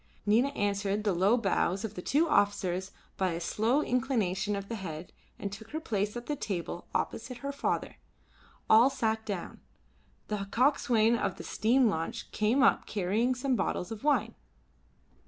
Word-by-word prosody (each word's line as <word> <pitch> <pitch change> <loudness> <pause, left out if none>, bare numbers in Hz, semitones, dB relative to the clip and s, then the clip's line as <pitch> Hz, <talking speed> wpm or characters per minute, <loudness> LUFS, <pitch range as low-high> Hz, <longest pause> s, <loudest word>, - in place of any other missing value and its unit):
Nina 225 +6 +4
answered 205 0 0
the 205 -3 +1
low 195 +7 +3
bows 195 -2 0
of 215 - -6
the 180 - -6
two 300 - +2
officers 195 - +1 0.3
by 185 -2 +1
a 165 - -3
slow 225 - +1
inclination 215 -6 0
of 200 0 -5
the 230 - -5
head 175 -6 -6 0.2
and 200 - -4
took 220 +2 -9
her 315 - -3
place 210 -6 -2
at 240 - -7
the 295 - -2
table 180 - -4
opposite 240 +2 -2
her 280 - -1
father. 280 - -2 0.7
All 230 +4 +7
sat 225 -5 -1
down. 195 -5 -5 0.7
The 205 -2 -3
coxswain 235 -2 +3
of - - -2
the - - -7
steam 245 +3 +3
launch 200 +4 -3
came 230 +5 +2
up 275 - +3
carrying 215 +6 0
some 260 +1 0
bottles 180 -4 -2
of 220 -2 -7
wine. 295 -1 +2
215 Hz, 165 wpm, -30 LUFS, 195-245 Hz, 0.7 s, All